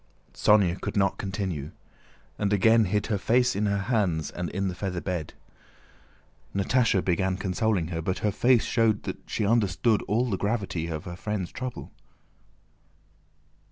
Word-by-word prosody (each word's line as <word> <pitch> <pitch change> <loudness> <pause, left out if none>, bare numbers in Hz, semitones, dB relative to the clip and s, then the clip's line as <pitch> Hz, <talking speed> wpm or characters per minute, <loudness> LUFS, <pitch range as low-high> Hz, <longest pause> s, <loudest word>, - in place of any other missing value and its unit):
Sónya 95 -4 +3
could - - -3
not 95 -1 +1
continue, 95 -7 -4 0.7
and 105 -1 0
again 110 +2 +5
hid 105 +2 0
her 105 -3 -1
face 125 +3 +2
in 105 +1 0
her 100 0 +1
hands 100 - 0
and 90 -1 -4
in 100 +5 -2
the 90 - -2
feather 90 -1 -3
bed. 90 -4 -4 1.2
Natásha 100 0 +2
began 95 +1 +1
consoling 100 -2 0
her, 80 -2 -3
but 90 +3 -2
her 105 - +2
face 120 +3 +3
showed 115 -3 +1
that - - -5
she 105 - -1
understood 110 0 +2
all 115 +5 +1
the 95 - 0
gravity 95 -6 -1
of 80 -2 -4
her 85 - -7
friend's 105 -2 -3
trouble. 130 -1 -6
100 Hz, 155 wpm, -27 LUFS, 90-110 Hz, 1.2 s, again